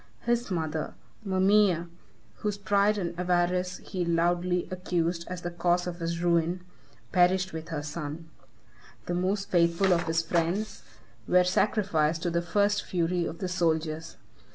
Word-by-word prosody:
His 240 0 0
mother, 160 -4 -2 0.3
Mamæa, 190 -3 +3 0.5
whose 210 -1 -2
pride 205 +1 +2
and 175 -4 -2
avarice 180 0 +1
he 185 -3 -2
loudly 175 +1 +1
accused 175 -2 -1
as 180 -1 -6
the 175 - -3
cause 175 +1 +1
of 175 0 -5
his 170 0 -3
ruin, 170 +1 +2 0.5
perished 185 0 +3
with 160 +1 -6
her 150 -3 -3
son. 155 +1 -6 0.8
The 175 - -2
most 190 +3 -1
faithful 175 +2 +3
of 170 0 0
his 165 0 +1
friends 170 +6 -1 0.5
were 180 0 +5
sacrificed 180 -4 +1
to 175 - 0
the 170 0 +1
first 205 +4 +1
fury 175 0 0
of 165 - -6
the 185 - -3
soldiers. 160 -2 -1
175 Hz, 145 wpm, -28 LUFS, 170-185 Hz, 0.8 s, were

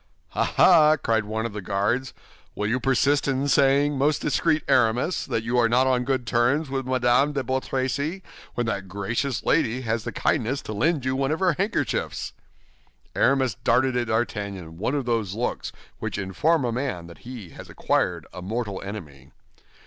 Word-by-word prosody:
"Ah, - - 0
ah!" 155 -4 +6
cried 115 -5 0
one 110 +2 -3
of 115 - -4
the 105 - -5
Guards, 105 +7 -1 0.4
"will 105 - -2
you 125 +4 0
persist 135 +3 +2
in 135 +1 0
saying, 140 +1 +3
most 145 +2 +2
discreet 155 +2 +1
Aramis, 125 +9 +2
that 110 - -1
you 120 +2 +1
are 115 -1 +3
not 125 +3 +3
on 125 -1 +1
good 130 -2 -1
terms 125 +6 +1
with 135 -1 -2
Madame 130 +3 +2
de 140 -2 -1
Bois 130 +2 0
Tracy, 140 +8 -2 0.3
when 120 - 0
that 100 -3 -3
gracious 105 +6 -2
lady 120 +3 +2
has 115 -2 -2
the - - -4
kindness 135 -1 0
to 110 - -5
lend 150 +5 0
you 130 0 0
one 135 0 0
of 160 +2 -1
her 185 -2 +3
handkerchiefs?" 195 +7 -2 0.8
Aramis 130 -3 +2
darted 130 +2 +3
at 120 -1 0
D'Artagnan 100 -7 -3
one 125 +7 -1
of 140 -3 -1
those 110 -5 -1
looks 120 +2 -3 0.3
which - - -4
inform 130 - +1
a 120 - 0
man 120 -8 -3
that 85 0 -13
he 120 -7 -9
has - - -11
acquired - - 0
a 90 - -7
mortal 105 0 -3
enemy. 75 -10 -9
125 Hz, 180 wpm, -24 LUFS, 110-135 Hz, 0.8 s, ah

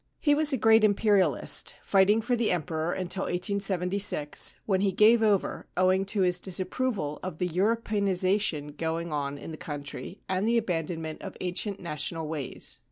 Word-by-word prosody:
He 290 - +3
was 300 0 +5
a 265 - +1
great 225 -1 +4
Imperialist, 200 - +2
fighting 200 +3 +3
for 245 +2 0
the 235 -2 0
Emperor 160 -1 -2
until 185 +1 -2
1876, 185 -3 +1
when 190 -2 0
he 200 -1 +1
gave 220 +4 +4
over 210 -3 0
owing 185 +1 +2
to 200 +1 -1
his 180 -1 +3
disapproval 185 - -2
of 185 -4 -6
the 180 - -1
Europeanisation 195 -5 0
going 165 0 -3
on 140 -1 -3
in 160 - -9
the 155 - -8
country 145 +6 -7
and 190 +3 -1
the 235 +1 +2
abandonment 165 -6 -3
of 195 - -8
ancient 185 +3 -2
national 160 -1 -3
ways. 150 -4 -3
185 Hz, 160 wpm, -27 LUFS, 165-205 Hz, -, was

